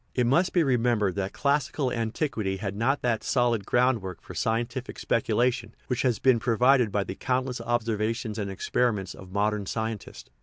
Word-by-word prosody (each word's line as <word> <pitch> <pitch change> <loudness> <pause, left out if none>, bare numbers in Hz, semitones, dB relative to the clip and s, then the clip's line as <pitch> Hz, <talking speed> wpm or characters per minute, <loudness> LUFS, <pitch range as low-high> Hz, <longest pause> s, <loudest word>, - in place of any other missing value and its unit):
It 125 - +2
must 165 +10 +3
be 175 - +3
re 130 -4 +2
membered 115 -5 +1
that 100 0 -1
classical 140 -1 0
antiquity 110 -4 -2
had 100 0 -4
not 130 +7 0
that 120 -3 0
solid 120 -5 +1
groundwork 120 -7 +1
for - - -11
scientific 120 +3 -2
speculation 115 0 0
which 125 - -1
has 125 -4 +2
been 130 +1 +4
provided 125 0 +3
by 100 0 +1
the 95 - -5
countless 125 +2 -2
observations 115 -1 -1
and 100 -2 -2
experiments 95 0 -1
of 95 -1 -12
modern 105 0 0
scientists. 110 -1 -5
115 Hz, 165 wpm, -27 LUFS, 105-125 Hz, -, been